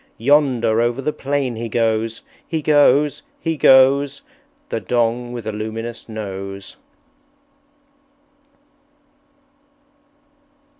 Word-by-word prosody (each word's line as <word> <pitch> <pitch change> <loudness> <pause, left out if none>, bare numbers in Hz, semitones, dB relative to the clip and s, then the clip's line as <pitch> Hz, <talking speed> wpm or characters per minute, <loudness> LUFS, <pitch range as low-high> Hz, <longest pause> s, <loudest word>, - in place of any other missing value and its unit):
Yonder, 120 -4 +2
over 120 +2 0
the 150 +3 -2
plain 135 -3 -2
he 115 0 -4
goes, 115 0 -1 0.2
He 160 -2 -3
goes! 145 -1 +3 0.2
He 165 -1 -2
goes, 140 0 +4 0.5
The - - -2
Dong 120 0 -1
with 120 -3 -7
a 110 - -2
luminous 110 +2 -6
Nose!" 100 -2 -7
120 Hz, 90 wpm, -20 LUFS, 110-140 Hz, 0.5 s, goes